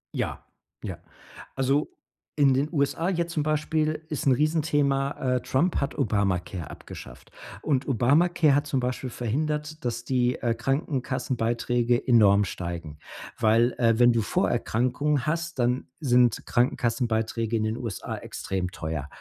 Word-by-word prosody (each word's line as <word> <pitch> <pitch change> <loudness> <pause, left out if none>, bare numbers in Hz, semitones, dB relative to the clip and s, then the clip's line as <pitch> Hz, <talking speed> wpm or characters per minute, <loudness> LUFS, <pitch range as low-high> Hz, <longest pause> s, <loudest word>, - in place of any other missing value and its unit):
Ja, - - -3 0.4
ja, - - -5 0.6
also, 135 +2 +1 0.5
in 140 -3 +4
den 140 +3 +1
USA, 165 +4 0
jetzt 170 -2 -1
zum 155 - 0
Beispiel 155 +1 0
ist 150 - -3
'n 135 - +5
Riesenthema, 140 -3 +1
äh, - - -4
Trump 165 +10 +1
hat 140 - -2
Obamacare 95 -5 -1
abgeschafft, - - -11 0.3
und 140 -3 0
Obamacare 150 +5 +3
hat 145 0 +1
zum 135 -2 0
Beispiel 125 +1 -3
verhindert, 150 +6 -3
dass 120 0 -2
die, 125 -1 +1
äh, 120 -1 +1
Krankenkassenbeiträge 125 -2 -1
enorm 105 -5 +5
steigen, 85 -5 -5 0.4
weil, 115 +2 +3
äh, 115 -1 +3
wenn 120 0 +6
du 115 - +2
Vorerkrankungen 125 +6 0
hast, 165 -2 -2
dann 125 +2 +1
sind 125 -5 +3
Krankenkassenbeiträge 115 -2 0
in 110 - +1
den 110 +1 -1
USA 115 -6 -5
extrem 90 -2 -4
teuer. 80 -4 -4
125 Hz, 135 wpm, -26 LUFS, 115-145 Hz, 0.6 s, wenn